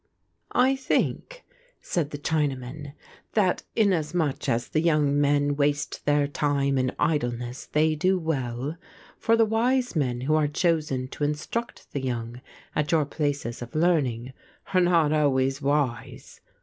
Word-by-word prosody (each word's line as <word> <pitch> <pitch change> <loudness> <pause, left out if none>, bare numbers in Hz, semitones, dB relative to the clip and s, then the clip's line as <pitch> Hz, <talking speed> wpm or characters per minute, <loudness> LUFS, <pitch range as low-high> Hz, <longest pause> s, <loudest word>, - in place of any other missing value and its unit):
"I 260 +2 +4
think," - - -2 0.3
said 160 -5 -2
the 145 - -6
Chinaman, 145 -2 -2 0.4
"that 195 -5 +2
inasmuch 170 - +1
as 120 +1 0
the 155 - +1
young 150 -3 +2
men 145 0 +2
waste 145 +1 -1
their 145 -1 +3
time 140 -2 0
in 130 0 +1
idleness 125 -5 -1
they 155 +1 +2
do 185 +5 +2
well; 140 -3 -3 0.4
for 230 0 +3
the 225 - +5
wise 245 +2 +1
men 125 -5 0
who 145 +4 0
are 155 -1 +3
chosen 150 -5 0
to 145 - -5
instruct 155 +11 -3
the 140 - -2
young 120 -1 -4 0.3
at 150 -1 0
your 160 -3 +3
places 145 -5 -3
of 120 +3 -8
learning, 135 -7 +1 0.4
are 185 - +5
not 170 -4 +3
always 135 -2 +1
wise. 135 -5 -2
145 Hz, 140 wpm, -26 LUFS, 135-165 Hz, 0.4 s, the